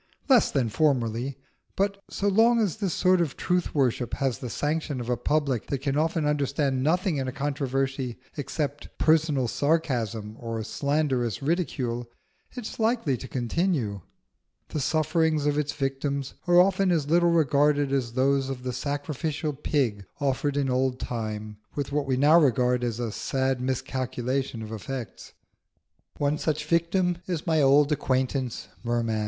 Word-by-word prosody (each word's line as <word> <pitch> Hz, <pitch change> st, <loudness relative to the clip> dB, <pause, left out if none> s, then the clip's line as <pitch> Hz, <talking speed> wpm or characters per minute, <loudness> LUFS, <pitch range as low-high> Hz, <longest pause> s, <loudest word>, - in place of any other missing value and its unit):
Less 260 Hz, -5 st, +5 dB
than 130 Hz, -5 st, +1 dB
formerly; 125 Hz, -1 st, 0 dB, 0.4 s
but 200 Hz, 0 st, 0 dB
so 200 Hz, -, -2 dB
long 225 Hz, +4 st, +4 dB
as 210 Hz, -5 st, 0 dB
this 200 Hz, -4 st, -1 dB
sort 185 Hz, +1 st, +3 dB
of 155 Hz, -5 st, -2 dB
truth 180 Hz, -2 st, 0 dB
worship 125 Hz, -3 st, +1 dB
has 135 Hz, -3 st, -1 dB
the 125 Hz, -, -5 dB
sanction 150 Hz, 0 st, -2 dB
of 120 Hz, 0 st, -5 dB
a -, -, +3 dB
public 135 Hz, -1 st, 0 dB
that 140 Hz, -2 st, -2 dB
can 140 Hz, -1 st, 0 dB
often 160 Hz, +1 st, +1 dB
understand 140 Hz, -2 st, 0 dB
nothing 170 Hz, +3 st, +1 dB
in 135 Hz, -1 st, -2 dB
a -, -, -2 dB
controversy 135 Hz, -2 st, -2 dB, 0.2 s
except 145 Hz, 0 st, -3 dB
personal 155 Hz, -5 st, +3 dB
sarcasm 120 Hz, -8 st, -1 dB
or 115 Hz, -1 st, -4 dB
slanderous 135 Hz, -4 st, -1 dB
ridicule, 130 Hz, -7 st, -1 dB, 0.5 s
it 245 Hz, -3 st, -6 dB
is -, -, -7 dB
likely 225 Hz, -, +1 dB
to 130 Hz, -, -8 dB
continue. 125 Hz, -, -1 dB, 0.7 s
The 155 Hz, -, -3 dB
sufferings 155 Hz, +1 st, +1 dB
of 145 Hz, -1 st, +2 dB
its 150 Hz, -1 st, 0 dB
victims 140 Hz, -1 st, -2 dB
are 175 Hz, 0 st, +6 dB
often 190 Hz, 0 st, +4 dB
as 155 Hz, -5 st, +1 dB
little 175 Hz, 0 st, +5 dB
regarded 145 Hz, -3 st, +3 dB
as 125 Hz, -4 st, -1 dB
those 135 Hz, +1 st, +2 dB
of 130 Hz, -2 st, -5 dB
the 125 Hz, -1 st, -3 dB
sacrificial 145 Hz, +3 st, -3 dB
pig 130 Hz, -7 st, -1 dB, 0.2 s
offered 140 Hz, 0 st, 0 dB
in 140 Hz, -1 st, +1 dB
old 130 Hz, 0 st, 0 dB
time, 110 Hz, -2 st, -4 dB, 0.2 s
with 140 Hz, -1 st, -3 dB
what 145 Hz, -1 st, 0 dB
we 130 Hz, -1 st, +1 dB
now 150 Hz, +5 st, +6 dB
regard 125 Hz, -3 st, +2 dB
as 120 Hz, -1 st, -2 dB
a 120 Hz, -2 st, -2 dB
sad 130 Hz, +2 st, -1 dB
miscalculation 130 Hz, -1 st, -2 dB
of 110 Hz, -, -8 dB
effects. 120 Hz, +2 st, -6 dB, 0.8 s
One 145 Hz, +1 st, 0 dB
such 150 Hz, -1 st, -1 dB
victim 170 Hz, +2 st, +1 dB
is 175 Hz, -4 st, -3 dB
my 160 Hz, -2 st, +2 dB
old 140 Hz, +2 st, +5 dB
acquaintance 130 Hz, -3 st, -1 dB, 0.2 s
Merman. 115 Hz, -2 st, 0 dB
140 Hz, 155 wpm, -26 LUFS, 125-155 Hz, 0.8 s, are